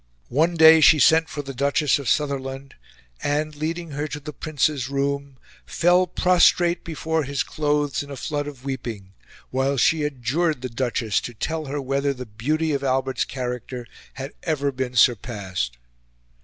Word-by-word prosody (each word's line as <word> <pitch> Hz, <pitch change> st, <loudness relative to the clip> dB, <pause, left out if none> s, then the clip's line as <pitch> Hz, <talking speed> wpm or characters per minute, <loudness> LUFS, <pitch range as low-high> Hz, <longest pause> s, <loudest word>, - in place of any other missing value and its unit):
One 160 Hz, +7 st, +2 dB
day 160 Hz, 0 st, +8 dB
she 155 Hz, -, +7 dB
sent 160 Hz, +3 st, +4 dB
for 145 Hz, -, -5 dB
the 135 Hz, 0 st, -7 dB
Duchess 140 Hz, +3 st, +1 dB
of 135 Hz, -5 st, -3 dB
Sutherland, 135 Hz, 0 st, -2 dB, 0.5 s
and, 150 Hz, +1 st, -1 dB
leading 165 Hz, +2 st, -4 dB
her 145 Hz, +2 st, -3 dB
to 150 Hz, 0 st, -6 dB
the 150 Hz, +1 st, -8 dB
Prince's 145 Hz, -4 st, -1 dB
room, 140 Hz, 0 st, -2 dB, 0.3 s
fell 175 Hz, -, +3 dB
prostrate 175 Hz, -1 st, +3 dB
before 160 Hz, -1 st, -2 dB
his 140 Hz, 0 st, -1 dB
clothes 145 Hz, -2 st, -1 dB
in 145 Hz, -, -9 dB
a 140 Hz, -, -6 dB
flood 145 Hz, +2 st, -3 dB
of 135 Hz, -3 st, -10 dB
weeping, 115 Hz, -8 st, -5 dB, 0.4 s
while 135 Hz, +2 st, 0 dB
she 155 Hz, +5 st, +3 dB
adjured 150 Hz, +2 st, -1 dB
the 130 Hz, -, -3 dB
Duchess 115 Hz, -3 st, -1 dB
to 120 Hz, -, -7 dB
tell 160 Hz, +7 st, -3 dB
her 145 Hz, +1 st, -3 dB
whether 140 Hz, +1 st, -1 dB
the 125 Hz, 0 st, -7 dB
beauty 150 Hz, +9 st, -1 dB
of 140 Hz, -1 st, -2 dB
Albert's 135 Hz, 0 st, 0 dB
character 125 Hz, -1 st, -5 dB, 0.3 s
had 135 Hz, +1 st, -6 dB
ever 145 Hz, -4 st, -1 dB
been 130 Hz, -1 st, -4 dB
surpassed. 100 Hz, -, +1 dB
140 Hz, 160 wpm, -23 LUFS, 130-155 Hz, 0.5 s, day